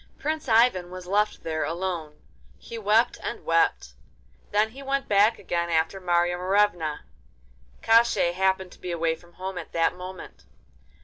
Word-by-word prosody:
Prince 310 -2 -3
Ivan 225 -6 +4
was 185 0 -9
left 205 +3 0
there 155 -1 -2
alone. 165 -1 -4 0.3
He 230 - -10
wept 220 +3 +2
and - - -6
wept; 165 - +1 0.6
then 210 +1 +2
he 270 +4 -11
went 275 0 -2
back 210 +3 +4
again 170 0 -2
after 165 +4 0
Marya 175 0 +1
Morevna. 180 -5 +1 0.8
Koshchei 225 -6 +4
happened 190 0 0
to - - -16
be 180 - -6
away 165 -1 0
from 175 +1 -21
home 185 +1 -5
at - - -10
that 165 -1 +2
moment. 180 0 -10
185 Hz, 150 wpm, -26 LUFS, 170-210 Hz, 0.8 s, Ivan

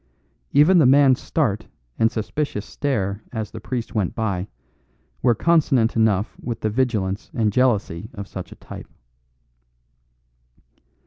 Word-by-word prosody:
Even 170 +5 +6
the 145 - +6
man's 135 -1 +5
start 110 -9 -1 0.3
and 115 0 +4
suspicious 110 -1 -3
stare 105 -8 -2
as 110 -3 -4
the 110 - -7
priest 120 +2 -4
went 105 -6 -1
by 100 -4 -2 0.7
were 120 -2 +3
consonant 140 -7 +2
enough 110 -2 +1
with 120 -2 -5
the 110 - 0
vigilance 105 -5 -1
and 110 -4 +1
jealousy 105 -6 +1
of 100 -1 -6
such 95 -2 -8
a - - -10
type. - - -10
110 Hz, 130 wpm, -22 LUFS, 105-130 Hz, 0.7 s, Even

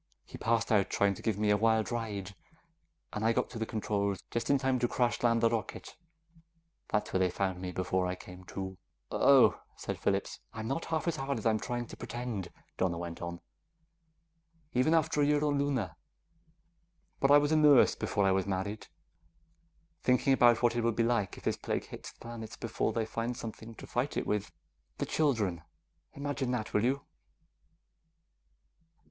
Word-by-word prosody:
He - - -11
passed 115 0 +1
out 100 -3 +3
trying 100 -1 +2
to - - -10
give 110 -4 0
me 105 0 +2
a 105 - +4
wild 110 +1 +2
ride, 105 -4 -3 0.8
and 105 - -3
I 115 +1 +4
got 125 - -1
to 115 - -6
the 110 - -2
controls 100 -2 -1
just 115 -1 -2
in 140 - +5
time 130 -1 +1
to 120 - +2
crash 120 0 0
land 115 -1 +3
the 115 - +5
rocket; 115 -2 -4 0.9
that's 105 - -1
where 95 - +2
they 95 -1 +3
found 95 0 -2
me 90 -1 -4
before 90 0 0
I 90 - -2
came 90 0 -12
to." 95 0 -6 0.3
"Oh," - - +5
said - - -5
Phillips. - - -1
"I'm 110 0 -5
not 135 +6 -2
half 160 0 -2
as 165 -2 0
hard 135 0 -2
as 110 - -6
I'm 110 -1 +3
trying 120 +1 -3
to - - -10
pretend," 120 -6 -5 0.3
Donna 90 -2 +1
went 85 -1 -6
on, 85 0 -5 1.3
"even 130 +6 +3
after 155 -2 +2
a - - +5
year 150 +1 +2
on 145 -1 +1
Luna. 130 - -1 1.2
But 135 - +3
I 145 - +9
was 145 +1 +2
a - - +4
nurse 150 -4 +6
before 100 -2 0
I 95 - +4
was 95 0 +1
married. 100 +2 -3
I'm 165 0 -40
thinking 125 +2 +3
about 120 -2 +5
what 120 0 +3
it 120 - +1
will 115 0 +2
be 115 - +1
like 115 -5 0
if - - -12
this - - 0
plague - - -2
hits - - -9
the - - -29
planets 115 -1 -7
before 115 -2 -1
they 115 -1 -1
find 115 +2 -3
something 115 0 -8
to - - -10
fight 125 +4 -2
it - - -1
with. 105 -1 -1 0.5
The - - -1
children... 110 - +1 0.5
imagine 140 -2 -2
that, 115 -3 -3
will 105 - +2
you?" 135 +3 0
115 Hz, 190 wpm, -31 LUFS, 100-130 Hz, 1.3 s, I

